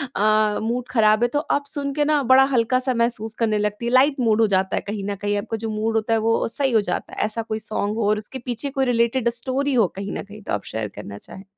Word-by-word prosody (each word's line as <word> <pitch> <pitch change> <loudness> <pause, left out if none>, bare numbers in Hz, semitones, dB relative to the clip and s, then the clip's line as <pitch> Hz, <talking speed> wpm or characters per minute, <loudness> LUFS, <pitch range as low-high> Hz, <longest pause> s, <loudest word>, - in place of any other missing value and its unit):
अ, 215 0 +2
mood 240 +2 -2
ख़राब 215 -1 +3
है - - +4
तो - - +3
आप 285 - +1
सुन 280 -1 -3
के 295 0 +1
ना 300 -1 +2
बड़ा 265 +1 +7
हल्का-सा 255 +2 +1
महसूस 235 -2 -1
करने 220 -2 +1
लगती 210 +2 -2
हैं। 235 - -1
लाइट 275 +3 +5
मूड 225 -2 +2
हो 220 - +4
जाता 190 0 -1
है - - -1
कहीं 205 -1 -4
न - - -3
कहीं। 205 +1 -2
आपका 225 +2 -3
जो 225 +1 -4
मूड 220 +1 -2
होता 220 +1 +1
है 225 - +3
वो 225 +1 +1
सही 270 +3 -1
हो 220 -2 +4
जाता - - -4
है। - - -9
ऐसा 215 +2 -2
कोई 220 -1 -4
सॉन्ग 215 -1 -2
हो 220 -3 0
और 210 - +2
उसके 215 +5 -7
पीछे 245 +3 -3
कोई 270 -1 0
रिलेटेड 235 0 +1
स्टोरी 275 +2 -1
हो 225 -6 +4
कहीं 195 +1 -5
न - - -5
कहीं 205 +1 -13
तो - - -5
आप 100 - -2
शेयर 110 -1 -4
करना 100 -1 -8
चाहें? 190 - -12
225 Hz, 270 wpm, -22 LUFS, 210-250 Hz, -, बड़ा